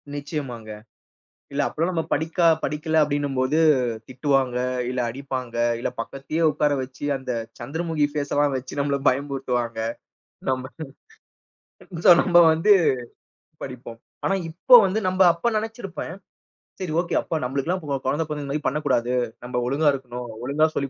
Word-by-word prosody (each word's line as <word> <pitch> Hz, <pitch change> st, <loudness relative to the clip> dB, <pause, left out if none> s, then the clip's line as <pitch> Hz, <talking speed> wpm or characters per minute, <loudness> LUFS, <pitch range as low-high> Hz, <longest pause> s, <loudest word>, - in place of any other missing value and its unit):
நிச்சயமாங்க. 140 Hz, -6 st, -5 dB, 0.8 s
இல்ல, 140 Hz, +1 st, 0 dB
அப்பல்லாம் 165 Hz, +4 st, -1 dB
நம்ம 165 Hz, -2 st, -1 dB
படிக்கா 160 Hz, +3 st, +1 dB, 0.2 s
படிக்கல 155 Hz, +1 st, 0 dB
அப்படீன்னும் 145 Hz, -2 st, -1 dB
போது 130 Hz, +4 st, +2 dB, 0.5 s
திட்டுவாங்க, 130 Hz, -1 st, 0 dB, 0.3 s
இல்ல 125 Hz, 0 st, -2 dB
அடிப்பாங்க. 130 Hz, -1 st, -5 dB, 0.2 s
இல்ல 120 Hz, -, -2 dB
பக்கத்திலே 135 Hz, +7 st, -4 dB
உட்கார 150 Hz, 0 st, +1 dB
வச்சு, 130 Hz, +2 st, -8 dB
அந்த 130 Hz, -1 st, -7 dB, 0.3 s
சந்திரமுகி 160 Hz, +4 st, -1 dB
ஃபேஸல்லாம் 145 Hz, -1 st, 0 dB
வச்சு 130 Hz, +2 st, -6 dB
நம்மள 140 Hz, 0 st, 0 dB
பயமுறுத்துவாங்க. 130 Hz, -4 st, -1 dB, 0.7 s
நம்ப 130 Hz, 0 st, -1 dB, 1.4 s
சோ, -, -, +10 dB
நம்ப 175 Hz, -2 st, +4 dB
வந்து 165 Hz, +7 st, +4 dB, 0.9 s
படிப்போம். 125 Hz, -3 st, -9 dB, 0.3 s
ஆனா 195 Hz, -, +2 dB, 0.2 s
இப்போ 175 Hz, +9 st, +4 dB
வந்து 190 Hz, +3 st, -1 dB
நம்ப 185 Hz, +1 st, +3 dB
அப்ப 170 Hz, +8 st, -1 dB
நெனைச்சிருப்பேன், 215 Hz, -7 st, -5 dB, 0.7 s
சரி 180 Hz, -4 st, -3 dB
ஓகே. 175 Hz, -, -3 dB
அப்ப 160 Hz, -, -2 dB
நம்பளுக்கெல்லாம் 140 Hz, +8 st, -1 dB
கொ -, -, -8 dB, 0.2 s
கொழந்த 145 Hz, +5 st, +1 dB
பொறந்தா 150 Hz, -1 st, -4 dB
இந்த 140 Hz, -, -4 dB
மாதிரி 150 Hz, +1 st, -2 dB
பண்ணக்கூடாது. 130 Hz, -4 st, 0 dB, 0.3 s
நம்ப 125 Hz, 0 st, -5 dB
ஒழுங்கா 145 Hz, +4 st, +2 dB
இருக்கணும். 125 Hz, -2 st, -6 dB, 0.2 s
ஒழுங்கா 145 Hz, +4 st, +3 dB
சொல்லி 140 Hz, -, -1 dB
145 Hz, 135 wpm, -24 LUFS, 130-160 Hz, 1.4 s, சோ